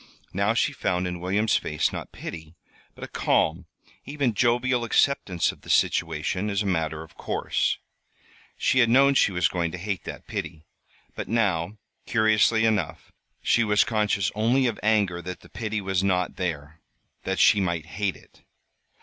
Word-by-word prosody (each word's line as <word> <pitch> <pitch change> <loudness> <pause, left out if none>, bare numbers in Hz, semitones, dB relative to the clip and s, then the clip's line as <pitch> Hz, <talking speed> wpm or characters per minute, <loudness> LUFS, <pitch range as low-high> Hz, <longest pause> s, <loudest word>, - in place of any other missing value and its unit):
Now 100 +4 +1
she 140 - +1
found 90 -8 -1
in 90 -1 -4
William's 100 +5 +1
face, 75 -1 -1
not - - -6
pity, 80 0 -8 0.4
but - - -11
a - - -5
calm, 85 +2 0 0.4
even 140 -3 -1
jovial, 120 +3 +1
acceptance 110 - +1
of - - -17
the - - -14
situation 85 +5 +1
as 100 0 0
a - - -6
matter 80 -4 -1
of 80 - -16
course. - - -1 0.8
She 130 - +2
had 120 -2 +5
known 135 +3 +5
she 120 - +3
was 90 -3 +2
going 85 -2 -1
to - - -4
hate 95 0 -4
that - - -8
pity; 80 0 -6 0.5
but - - -6
now, 100 -4 0 0.3
curiously 110 0 +3
enough, 80 -9 -1 0.3
she 120 - +3
was 105 -1 +3
conscious 105 -3 0
only 120 +5 +2
of 115 -3 -1
anger 100 -5 +1
that 90 +1 -7
the - - -17
pity 110 -1 -3
was 95 -1 -1
not 90 -2 0
there 80 -3 -4 0.4
that - - -2
she 105 - +5
might 85 -4 -1
hate 95 +3 -2
it. - - -20
100 Hz, 165 wpm, -25 LUFS, 85-110 Hz, 0.8 s, had